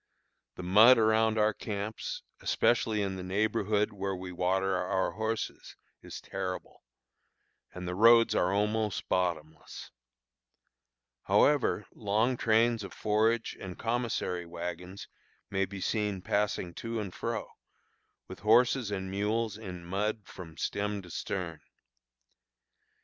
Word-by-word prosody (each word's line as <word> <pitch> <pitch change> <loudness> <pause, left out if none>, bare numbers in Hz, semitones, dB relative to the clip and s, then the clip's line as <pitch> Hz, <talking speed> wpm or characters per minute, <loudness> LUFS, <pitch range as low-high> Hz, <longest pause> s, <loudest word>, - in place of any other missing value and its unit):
The 90 - -7
mud 110 +8 +7
around 110 0 +3
our 110 0 +3
camps, 105 +1 -5 0.2
especially 110 -3 +1
in 95 -1 -3
the 90 - -6
neighborhood 105 +2 0
where 100 -1 -3
we 90 0 -7
water 95 +2 +1
our 95 0 0
horses, 110 +4 -4 0.3
is - - -8
terrible, 95 -1 -6 0.9
and 90 0 -7
the 90 - -2
roads 115 +2 +6
are 90 -3 +2
almost 105 +1 0
bottomless. 80 -4 -3 1.3
However, 145 -7 +3
long 110 +4 +1
trains 115 -1 +2
of 100 - -8
forage 110 +2 +1
and 95 -2 -7
commissary 115 -7 -2
wagons 90 +2 -6 0.4
may 95 0 +1
be 95 +1 -8
seen 105 -1 -1
passing 100 -4 -1
to 115 0 -3
and 100 -4 -5
fro, - - -4 0.8
with 95 - -9
horses 120 +2 +4
and 95 -2 -4
mules 105 +2 -1
in 90 -5 -8
mud 105 +3 -2
from 80 -3 -11
"stem 100 +1 -2
to 90 - -12
stern." 85 -4 -4
100 Hz, 120 wpm, -30 LUFS, 90-110 Hz, 1.3 s, mud